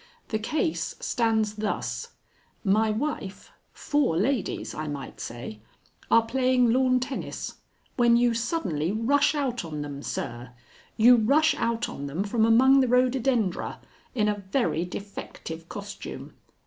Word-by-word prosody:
"The 215 - -1
case 310 +8 -1
stands 220 -3 0
thus: 210 0 -3 0.5
My 215 +2 +3
wife 215 -4 -3 0.2
four 290 - 0
ladies, 235 +4 -1
I 155 0 -4
might 145 -2 -6
say 120 -2 -7 0.5
are 230 0 +5
playing 250 0 +2
lawn 255 0 +3
tennis, 255 +1 -5 0.4
when 235 -1 +5
you 240 0 +3
suddenly 200 - -1
rush 280 +8 +2
out 260 -6 -1
on 150 -3 -5
them, 140 -1 -6
sir; 120 -2 -5 0.4
you 240 +3 +7
rush 285 +8 +4
out 230 0 -1
on 140 - -6
them 155 +8 -2
from 220 +2 +2
among 260 +4 +6
the 260 - +3
rhododendra 250 -5 +1 0.4
in 210 -3 +2
a 205 -1 -1
very 170 - +1
defective 175 -3 -8
costume. 205 0 -8
225 Hz, 135 wpm, -26 LUFS, 190-255 Hz, 0.5 s, you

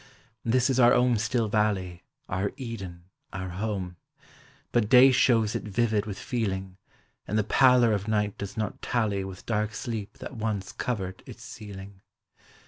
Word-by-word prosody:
This 125 +3 +2
is 130 - +1
our 120 -1 +6
own 125 -2 +3
still 115 +1 0
valley 100 -5 0 0.3
Our 95 +2 -2
Eden, 100 -9 -7 0.3
our 95 -1 -5
home, 95 -2 -4 0.7
But 115 -3 +1
day 130 +2 +8
shows 115 -4 +3
it - - -2
vivid 110 0 0
with 100 -2 -5
feeling 95 -6 -3 0.5
And 105 - -1
the 110 - +3
pallor 125 0 +5
of 100 0 -2
night 105 -2 0
does 100 +1 -7
not 110 -3 -3
tally 105 -5 0
With 95 -1 -9
dark 110 -1 -1
sleep 110 -4 -5
that - - -8
once 105 -4 -3
covered 95 -8 -4
its - - -11
ceiling. 100 -2 -10
105 Hz, 155 wpm, -27 LUFS, 95-115 Hz, 0.7 s, day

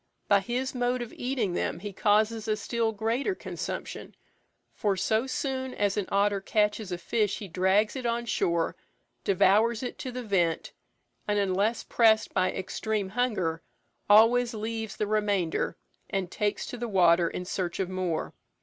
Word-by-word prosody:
By 200 -1 +5
his 245 +5 -2
mode 245 0 0
of 235 - -10
eating 245 -7 -1
them - - -1
he 200 +3 -7
causes 215 +2 +2
a 215 -1 +1
still 230 -1 -1
greater 230 - -1
consumption, - - -6 0.6
for 200 -2 0
so 220 +6 +1
soon 260 -1 -3
as 205 -1 +1
an 205 -3 -1
otter 200 0 +2
catches 210 0 0
a 175 - -2
fish 205 +3 0
he 205 - -7
drags 190 +6 +2
it 255 -2 -2
on 235 0 -1
shore, 170 -6 0 0.5
devours 215 +5 +3
it 250 - -5
to 255 - -4
the 250 0 -5
vent, 175 -6 0 0.6
and, 210 0 +1
unless 200 +3 +1
pressed 220 -2 +3
by 185 -1 +2
extreme 205 +1 -2
hunger, 190 -8 -1 0.5
always 230 +3 +6
leaves 220 0 -4
the 210 - 0
remainder, 205 -6 0 0.3
and 190 -2 -2
takes 210 -1 -1
to 245 - -6
the 240 0 -3
water 175 -3 +4
in 180 - -5
search 180 -1 -3
of 190 - 0
more. 185 -3 -2
210 Hz, 160 wpm, -28 LUFS, 190-235 Hz, 0.6 s, always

